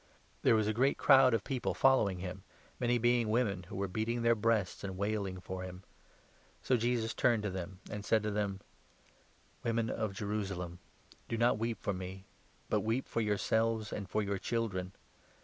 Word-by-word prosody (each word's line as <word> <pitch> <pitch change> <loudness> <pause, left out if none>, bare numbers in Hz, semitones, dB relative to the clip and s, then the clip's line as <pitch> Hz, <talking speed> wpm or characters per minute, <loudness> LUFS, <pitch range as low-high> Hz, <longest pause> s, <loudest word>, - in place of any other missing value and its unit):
There - - +5
was 110 -1 +2
a 110 - +1
great 130 +5 +2
crowd 135 -4 +6
of 110 - -1
people 130 -3 -2
following 110 -8 +4
him, 90 +1 -6 0.4
many 120 0 +2
being 120 -1 +2
women 105 -6 +1
who - - -7
were 100 0 -1
beating 115 +5 -1
their 115 0 +5
breasts 110 -4 0
and 95 -2 -4
wailing 100 -2 -2
for 95 0 -6
him. 95 0 -8 0.8
So 130 - +3
Jesus 120 -1 0
turned 120 -5 +2
and 95 +2 -5
said 110 +1 +2
to 105 - -1
them: 100 -2 -2 1.0
"Women 115 0 0
of 110 -3 -2
Jerusalem, 95 -4 -3 0.5
do 115 - -1
not 115 -1 +3
weep 115 0 -1
for 100 - 0
me, 95 +1 -7 0.4
but - - +2
weep 115 +4 -1
for 115 - -1
yourselves 110 +1 +1
and 100 -2 -5
for 110 +2 0
your 100 -1 -2
children. 95 -6 -2
110 Hz, 170 wpm, -33 LUFS, 95-115 Hz, 1.0 s, crowd